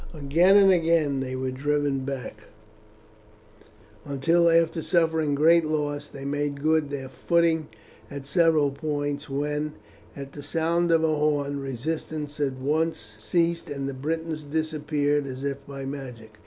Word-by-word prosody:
Again 165 +7 +4
and 195 -1 +7
again 165 -5 +2
they 130 -1 -3
were 130 0 -2
driven 145 +1 0
back, 130 -5 -6 1.6
until 165 +5 +2
after 165 0 +3
suffering 160 -4 +1
great 165 +3 +5
loss 145 -1 -2
they 140 -1 -9
made 145 0 -2
good 155 -2 +2
their 140 -2 -5
footing 165 +2 +1 0.4
at 140 -1 -7
several 155 -1 +3
points, 145 0 -3
when, 150 +2 -2 0.4
at 140 0 -8
the 145 - -9
sound 165 +3 0
of 165 -1 +4
a 155 -1 +2
horn, 145 -2 0
resistance 150 +3 -4
at 140 -2 0
once 145 -4 -2
ceased, 170 +7 0
and 140 -1 -4
the 140 - -3
Britons 160 +3 -3
disappeared 150 -1 -1
as 130 0 -6
if 140 -1 -3
by 135 -1 -7
magic. 125 -6 -8
145 Hz, 140 wpm, -26 LUFS, 140-160 Hz, 1.6 s, and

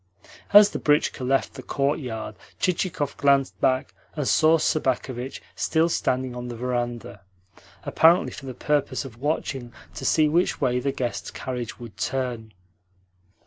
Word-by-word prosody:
As 205 0 +8
the - - -4
britchka 150 -2 +1
left 135 +2 +1
the - - -8
courtyard 125 -7 -2 0.3
Chichikov 170 -5 -1
glanced 140 -1 +2
back 130 0 +1 0.2
and 145 -4 -2
saw 160 +1 +5
Sobakevitch 130 -4 -1
still 160 +1 +1
standing 130 -5 -1
on 125 0 -6
the 120 - -6
verandah 120 -4 -3 0.6
apparently 165 +2 +4
for 135 - -9
the 130 - -6
purpose 145 +1 -1
of 120 -2 -11
watching 135 -4 -2 0.2
to - - -8
see 155 -1 +3
which 170 +4 +1
way 125 -4 +1
the 140 +2 -1
guest's 125 -3 -3
carriage 125 -3 -5
would 120 -3 -10
turn. 120 -4 -3
130 Hz, 145 wpm, -25 LUFS, 125-150 Hz, 0.6 s, As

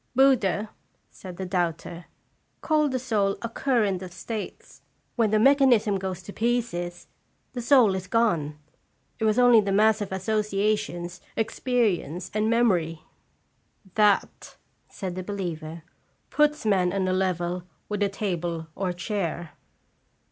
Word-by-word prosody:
"Buddha," 220 -6 +3 0.4
said 180 -2 -10
the 190 - -4
doubter, 175 -2 -2 0.6
"called 305 -2 +2
the 260 - 0
soul 215 -6 0
a - - -1
current 225 -7 0
of 185 -1 -7
states; 210 +4 -7 0.3
when 230 -3 +2
the 215 - +3
mechanism 240 -5 +4
goes 185 -2 -5
to 200 - -9
pieces, 220 -7 -2 0.5
the 245 - -4
soul 240 -5 +5
is 185 -1 -4
gone. 170 -10 +1 0.6
It 220 - 0
was 215 +1 +2
only 245 -3 +7
the 200 -1 -2
mass 215 +2 +4
of 200 - -4
associations, 200 -3 -1 0.2
experience, 215 - -1
and 215 +1 +1
memory." 180 -9 +1 0.4
" 190 -3 -30
That," 210 -2 +1 0.3
said 190 -3 -5
the 185 - -4
believer, 170 -5 -5 0.2
" - - -43
puts 300 -3 +2
man 185 -4 +2
on 190 -1 0
a 185 - +1
level 180 -1 -1 0.2
with 210 -1 -3
a 200 - +3
table 175 -5 -3
or 185 0 -2
chair." 175 -3 -3
200 Hz, 140 wpm, -26 LUFS, 180-225 Hz, 0.6 s, only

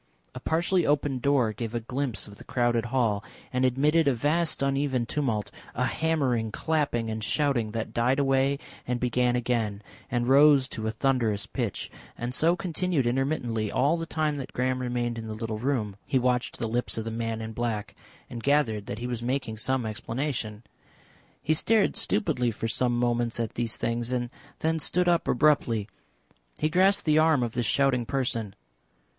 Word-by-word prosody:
A 125 - -6
partially 170 +6 +1
opened 145 -3 +1
door 130 -6 +2
gave 115 +1 -5
a - - +1
glimpse 125 +1 -3
of 100 -1 -12
the - - -12
crowded 120 -2 +1
hall, 115 -4 +1 0.3
and 130 0 +1
admitted 145 +5 +3
a 135 - +3
vast 155 +5 +1
uneven 135 -3 +1
tumult, 115 -6 -1 0.2
a - - +1
hammering, 135 -9 0
clapping 140 -7 0
and 110 0 -4
shouting 135 -5 +1
that 115 -1 -3
died 125 +3 +2
away 135 0 +2 0.3
and 125 0 -1
began 125 0 +1
again, 115 -4 -1 0.3
and 120 -1 0
rose 140 0 +6
to 110 -1 -4
a - - 0
thunderous 110 -4 0
pitch, 115 -1 -4 0.3
and 120 +1 -3
so 165 +6 +3
continued 180 -5 -1
intermittently 120 -4 0
all 145 +5 +2
the 165 -1 -4
time 155 -2 -1
that 135 - -6
Graham 130 0 0
remained 120 -1 -2
in 110 - -6
the 110 - -5
little 110 -1 -4
room. 115 -6 -1
He 135 - 0
watched 125 -1 0
the - - -2
lips 120 +2 -1
of 110 - -3
the 115 - -3
man 115 0 -2
in 110 0 -6
black 110 -3 -3 0.3
and 120 - -7
gathered 115 -7 +1
that 100 - -4
he 120 - -5
was 120 -2 -3
making 125 -2 -2
some 130 +2 0
explanation. 115 0 -3 0.8
He 155 - +2
stared 215 +6 +2
stupidly 130 - +1
for 115 0 -3
some 120 +1 +1
moments 120 -1 0
at 115 -2 -2
these 115 -1 -2
things 115 +1 -2
and 120 -1 -1 0.3
then 160 0 +1
stood 180 +4 +1
up 170 -1 +2
abruptly; 120 -7 +2 0.7
he 155 - +1
grasped 190 +4 +3
the 155 -1 +4
arm 155 -5 +4
of 120 - -2
this 120 -1 -1
shouting 125 -1 +2
person. 115 -7 -1
125 Hz, 180 wpm, -27 LUFS, 115-140 Hz, 0.8 s, rose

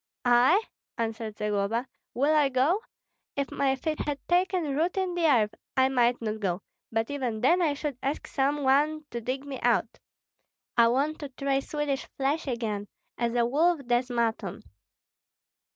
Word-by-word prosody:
"I?" 250 - +5 0.3
answered 225 -1 -3
Zagloba, 210 +3 0 0.3
"will 285 +5 +3
I 295 -3 +4
go? 270 +9 +2 0.6
If 280 -1 -2
my 270 -1 +1
feet 310 +4 -3
had 290 -1 -2
taken 350 -5 +1
root 335 +6 0
in 375 -2 0
the 345 -2 +2
earth, 225 -7 +3 0.2
I 260 0 +5
might 245 -2 +2
not 215 0 -2
go; 185 -2 -2 0.3
but 225 +3 -1
even 250 -6 -2
then 345 +8 +4
I 305 -4 +2
should 285 -3 -4
ask 280 +3 -2
some 285 +1 0
one 300 +3 +2
to 235 - -4
dig 260 +4 -3
me 275 -2 -6
out. - - +1 0.8
I 235 -1 +6
want 280 +6 +1
to 290 - -6
try 275 +1 0
Swedish 285 -1 -2
flesh 285 +4 0
again, 220 -5 -2 0.3
as 235 0 0
a 240 -1 +3
wolf 315 +6 +2
does 245 +1 +1
mutton. 225 -5 -1
270 Hz, 165 wpm, -28 LUFS, 235-295 Hz, 0.8 s, I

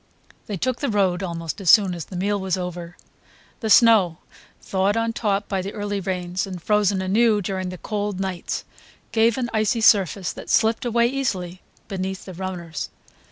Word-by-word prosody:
They 205 - -3
took 255 +6 -1
the 285 - -1
road 195 -4 +1
almost 170 0 -4
as 185 - 0
soon 195 -2 +6
as 170 -3 -5
the 185 - -10
meal 200 +3 0
was 190 -1 -1
over. 175 -1 -6 0.6
The 220 - -3
snow, 205 -6 +6 0.4
thawed 195 +3 0
on 230 0 0
top 205 -3 -1
by 195 -2 -1
the 195 +2 -6
early 205 -1 -3
rains, 180 -1 -3
and 185 -2 -6
frozen 205 0 +1
anew 215 +3 +3
during 190 -1 -3
the 185 - -7
cold 205 -1 -3
nights, 190 -3 -3 0.5
gave 230 +1 +3
an 245 -2 -2
icy 215 +1 +1
surface 195 -4 +3
that - - -10
slipped 225 +2 +2
away 235 0 +2
easily 190 -9 -2 0.3
beneath 190 0 -4
the 185 - -8
runners. 175 -3 -5
195 Hz, 175 wpm, -23 LUFS, 185-215 Hz, 0.6 s, soon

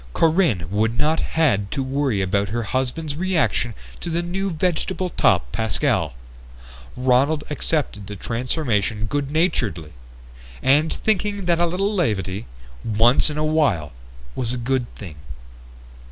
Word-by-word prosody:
Corinne 160 - +2
would 110 +3 +1
not 155 +3 +2
have - - -2
had 115 -12 +2
to 135 - -1
worry 130 -5 0
about 100 +1 0
her 115 +2 -1
husband's 130 +7 -2
reaction 165 - 0 0.2
to 175 - -4
the 170 +1 -1
new 190 +3 -2
vegetable 180 +2 -1
topped 60 - +2
Pascal. 110 - 0 0.8
Ronald 130 +4 +2
accepted 145 -9 -1
the 105 - -6
transformation 115 - -1
good 140 +4 -2
naturedly, 125 - 0 0.7
thinking 190 +8 +1
that 170 -1 +2
a 175 - +3
little 195 +5 0
levity, 105 - -1 0.4
once 115 +7 +4
in 150 - -4
a 155 - +1
while, 140 - +1 0.4
was 120 - -1
a - - -2
good 125 0 0
thing. 85 -8 -9
135 Hz, 135 wpm, -22 LUFS, 110-165 Hz, 0.8 s, once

